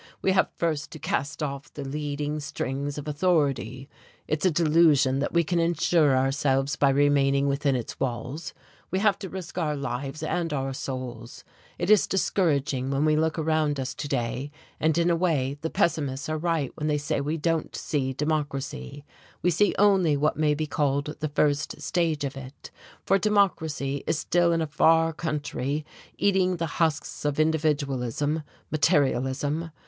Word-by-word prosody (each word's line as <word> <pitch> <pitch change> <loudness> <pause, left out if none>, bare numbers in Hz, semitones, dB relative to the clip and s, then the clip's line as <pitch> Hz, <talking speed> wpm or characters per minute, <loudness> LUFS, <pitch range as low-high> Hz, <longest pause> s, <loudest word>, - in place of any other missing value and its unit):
We 190 - +3
have 190 - +3
first 155 -3 -1
to - - -7
cast 145 +1 -2
off 140 -1 -5
the 145 - -7
leading 150 +1 -3
strings 140 0 -4
of 150 0 -6
authority. 145 -6 0 0.4
It's 155 +3 +1
a - - +5
delusion 155 -5 +4
that 140 - -1
we 170 0 +3
can 170 +2 0
insure 165 -4 +3
ourselves 135 +1 +1
by 140 -1 +3
remaining 140 0 +3
within 140 0 +1
its 120 -3 -5
walls 130 +5 -3 0.4
we 185 - -1
have 200 -1 +2
to 190 - -6
risk 185 -1 -6
our 150 -3 0
lives 135 +2 -4
and 165 0 -1
our 135 -1 -2
souls. 130 -3 -6 0.3
It 175 +4 0
is 215 - +5
discouraging 145 -9 0
when 140 +2 +1
we 155 0 +3
look 160 +1 +1
around 155 -2 +1
us 130 - -3
to 150 - -5
day, 130 0 -2 0.3
and 160 0 +2
in 170 +1 +3
a - - +3
way 145 -6 0
the 160 - -2
pessimists 145 -6 0
are 155 - -1
right 165 -5 0
when 150 - -3
they 150 -1 +2
say 145 0 -1
we 150 +3 -2
don't 165 0 -1
see 135 -3 -1
democracy. 145 - -3 0.4
We 180 - +3
see 200 +4 +2
only 190 -7 +4
what 150 +2 +1
may 150 -1 +2
be 155 +1 -2
called 145 0 -1
the 155 - -2
first 145 +1 0
stage 165 -4 0
of 140 -1 -3
it; 135 +1 -10 0.3
for 195 +1 +3
democracy 160 -9 +1
is - - +1
still 175 +2 +2
in 165 -1 +1
a - - 0
far 165 +2 +3
country 150 -2 -3 0.3
eating 185 -2 +2
the 165 - -1 0.2
husks 160 -3 0
of 145 0 -1
individualism, 150 -2 0 0.3
materialism. 145 0 +1
150 Hz, 170 wpm, -26 LUFS, 140-165 Hz, 0.4 s, a